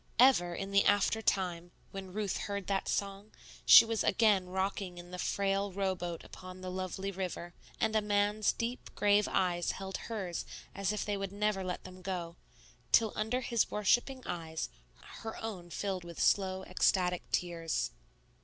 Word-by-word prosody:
Ever, 235 -9 +5
in 195 +2 -4
the 200 0 +5
after 205 +2 +3
time, 175 -4 0 0.2
when 190 -1 -7
Ruth 205 0 -2
heard 200 -1 -3
that 195 -1 -1
song, 200 +1 -3 0.3
she - - +11
was 225 -1 -1
again 205 -3 +3
rocking 190 -1 -2
in 175 0 -10
the 180 - -6
frail 195 +1 0
row 190 0 0
boat 175 -2 -5
upon 185 0 -10
the 185 0 -5
lovely 190 +1 -3
river, 180 -2 -5 0.3
and 220 0 +1
a 215 - +4
man's 205 0 +2
deep, 235 +2 -4
grave 205 0 +4
eyes 175 -2 +1
held 190 0 -5
hers 190 -7 -3 0.3
as 200 0 -1
if 210 - -2
they 205 -1 -1
would 195 -1 -4
never 205 -1 0
let 180 -1 -4
them 185 0 -11
go, 180 -3 -4 0.6
till 220 -2 +5
under 220 +4 0
his 235 -2 +1
worshipping 240 +5 +1
eyes 160 -2 -4 0.5
her 225 0 -5
own 190 -6 -6
filled 190 0 -3
with 170 -1 -9
slow 190 -1 +2
ecstatic 180 -1 +2
tears. 165 - -1
195 Hz, 165 wpm, -32 LUFS, 180-210 Hz, 0.6 s, she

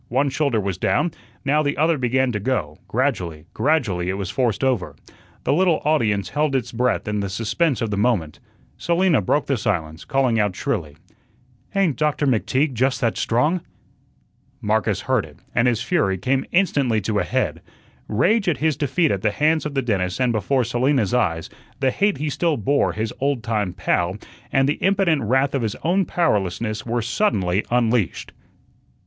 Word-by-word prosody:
One 135 +3 +1
shoulder 135 -5 +1
was 95 -3 -3
down, 160 - +1 0.3
now 145 +3 +3
the 145 -1 -1
other 160 +3 +3
began 130 +1 +1
to 105 - -2
go; 95 - -2
gradually, 90 - -1
gradually 110 - 0
it 95 - -2
was 95 -2 -4
forced 120 +1 0
over. 105 - 0 0.5
The - - +1
little 175 0 +3
audience 110 -10 +1
held 150 -2 0
its 130 -4 -1
breath 125 -1 0
in 105 0 -1
the 100 -1 -2
suspense 115 - 0
of 110 - -2
the 100 - -1
moment. 105 -10 0 0.4
Selina 170 - +2
broke 140 +10 +1
the 135 - 0
silence, 85 -8 -2
calling 130 -5 +1
out 105 -3 +1
shrilly: 85 - -3 0.8
"Ain't 185 -8 +2
Doctor 150 -1 +1
McTeague 130 +3 +1
just 130 +3 +1
that 115 -2 +1
strong!" 150 +10 +1 1.0
Marcus 105 -1 0
heard - - +1
it, - - -13 0.2
and 115 - +3
his 115 -2 +1
fury 130 - +1
came 130 +7 0
instantly 140 - +2
to 105 +1 -1
a - - +1
head. - - -1 0.5
Rage 195 - +2
at 165 - 0
his 155 -1 +1
defeat 150 +3 +1
at 100 - -1
the 105 - +2
hands 155 +9 +1
of 145 - -8
the 135 - +1
dentist 95 -5 -1
and 125 -2 +2
before 120 +5 +1
Selina's 120 -1 +1
eyes, 80 -10 0 0.3
the 135 -1 +2
hate 200 +5 +1
he 150 0 -2
still 155 +2 0
bore 140 +6 +1
his 110 0 -3
old 140 -4 0
time 105 -4 -1
"pal" 90 +1 0 0.3
and 135 0 +3
the 145 - -1
impotent 190 -6 +2
wrath 130 +5 +1
of 135 - 0
his 110 -3 -2
own 185 +3 +2
powerlessness 110 - -1
were 120 0 -1
suddenly 105 - +1
unleashed. 120 -5 0
125 Hz, 180 wpm, -22 LUFS, 105-145 Hz, 1.0 s, now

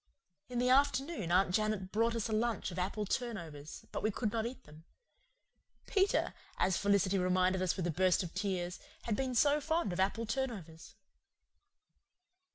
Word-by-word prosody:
In 245 - -4
the 250 +1 +2
afternoon 275 - +2
Aunt 180 0 +3
Janet 215 -2 0
brought 230 +2 +1
us 230 -1 -1
a - - -5
lunch 225 -2 0
of 180 - -5
apple 205 +3 -1
turnovers; 170 - -4
but - - -3
we 215 - +1
could 215 0 -2
not 225 +1 -1
eat 260 +1 -9
them. 155 +2 -15 1.0
Peter, 390 0 +2 0.2
as 185 - +2
Felicity 200 -1 +2
reminded 185 +1 +2
us 185 +1 0
with 185 - -1
a 175 - 0
burst 185 +3 +2
of 170 - -7
tears, 185 -2 -2 0.2
had 225 - -1
been 260 +1 -2
so 290 +4 +4
fond 320 - 0
of 175 - -4
apple 200 +4 +1
turnovers. 215 -11 -4
205 Hz, 165 wpm, -33 LUFS, 185-240 Hz, 1.0 s, so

